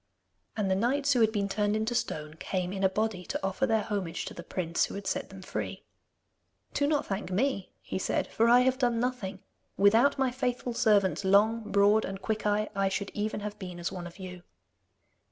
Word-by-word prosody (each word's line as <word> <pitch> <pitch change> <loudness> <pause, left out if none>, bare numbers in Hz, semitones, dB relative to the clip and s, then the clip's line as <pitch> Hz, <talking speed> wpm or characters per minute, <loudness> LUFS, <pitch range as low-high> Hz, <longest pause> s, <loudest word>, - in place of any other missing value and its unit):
And 200 -3 0
the - - +3
knights 275 +7 +2
who 245 - +2
had 220 -1 +4
been 205 -2 0
turned 205 +1 0
into 220 +2 -1
stone 155 -11 -2
came 185 -1 -2
in 195 0 -3
a 190 - +5
body 210 -1 -1
to - - -3
offer 195 +8 0
their 220 -2 +2
homage 190 -6 -3
to - - -6
the - - -8
prince 170 -1 -1
who - - -8
had 200 0 -6
set 190 - -2
them 195 -1 -11
free. - - -5 0.9
'Do 285 - +1
not 295 -1 +1
thank 195 -1 -3
me,' 200 -1 0
he - - -3
said, - - 0
'for 230 +1 +2
I 245 +1 +7
have 260 +1 +2
done 240 -3 +2
nothing. 230 -6 -3 0.3
Without 225 +9 +5
my 265 -2 +1
faithful 250 -1 -2
servants, 205 -5 +3
Long, 210 +3 +3
Broad, 205 +2 +4
and 195 0 -5
Quickeye, 215 0 0
I 195 -1 +2
should 195 +1 -3
even 210 0 -2
have 210 0 -6
been 180 -3 -7
as 175 - -2
one 175 -2 -6
of 170 - -13
you. 180 -2 -8
205 Hz, 210 wpm, -29 LUFS, 190-235 Hz, 0.9 s, I